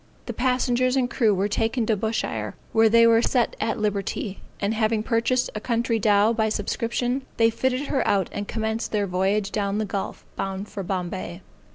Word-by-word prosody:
The - - -4
passengers 255 0 +1
and 260 -2 +2
crew 230 -2 +2
were 195 0 +1
taken 225 +3 0
to 220 - +2
Bushire 220 +3 -2 0.2
where 225 0 +5
they 230 +1 +6
were 230 0 +5
set 240 -1 +1
at 225 +2 0
liberty, 205 -1 -2 0.2
and 200 +2 0
having 220 -1 +1
purchased 240 +2 +1
a 215 - -3
country 230 -1 0
dow 210 +1 +4
by 220 -1 +1
subscription, 235 +4 -1 0.2
they 230 0 +4
fitted 255 +3 0
her 265 - +1
out 195 -3 +2
and 205 0 -4
commenced 220 0 -2
their 205 -1 +1
voyage 195 +2 0
down 200 -1 -1
the 215 - 0
gulf, 195 -1 -5
bound 195 +1 -4
for 200 - -5
Bombay. 185 -1 -4
220 Hz, 185 wpm, -24 LUFS, 200-235 Hz, 0.2 s, they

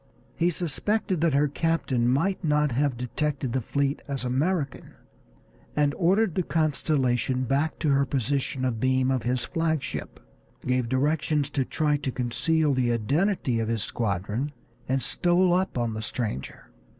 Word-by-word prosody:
He 170 - +2
suspected 180 +3 -1
that 165 -4 +3
her 145 +1 +4
captain 140 -5 0
might 175 +10 +1
not 150 -2 +2
have 135 0 0
detected 135 +1 -2
the 130 - +1
fleet 140 +4 -1
as 140 -2 -3
American, 140 +4 -1 0.8
and 145 -1 +2
ordered 190 +2 +2
the 185 - +1
Constellation 135 -6 0
back 140 +5 0
to 155 - 0
her 140 0 +4
position 135 0 -1
abeam 130 +2 +1
of 130 -2 +1
his 120 +1 -1
flag 160 -2 0
ship, - - -6 0.5
gave 125 -2 0
directions 145 +2 +1
to 135 - +1
try 150 +2 0
to 135 -2 -3
conceal 135 +6 +1
the 125 -2 +1
identity 135 - +1
of 110 - -1
his 115 -2 -1
squadron, 110 +5 -2 0.4
and 130 0 0
stole 175 +1 +3
up 185 -5 0
on 120 -2 0
the 110 - -4
stranger. 65 - -4
140 Hz, 150 wpm, -26 LUFS, 125-160 Hz, 0.8 s, her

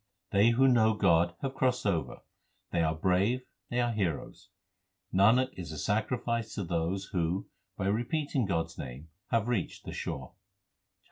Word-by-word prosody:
They 100 +3 +5
who 130 +3 +4
know 110 -3 +4
God 85 -3 +3
have 135 -1 -1
crossed 130 -3 +1
over; 90 -6 -1 0.5
they 85 - +1
are 80 -1 +1
brave, 95 +9 +2 0.3
they 120 - -1
are 120 -1 +2
heroes. 95 -9 -3 0.6
Nanak 115 +7 +5
is 85 -4 -6
a 80 - -6
sacrifice 115 +2 -1
to 100 - -2
those 85 +3 -2
who 90 +1 0 0.3
by 95 - -2
repeating 125 +4 0
God 80 -4 +1
s 85 - -14
name 65 +5 -7 0.2
have 115 -1 +1
reached 120 -7 -2
the - - -6
shore. - - -5
100 Hz, 155 wpm, -30 LUFS, 85-120 Hz, 0.6 s, They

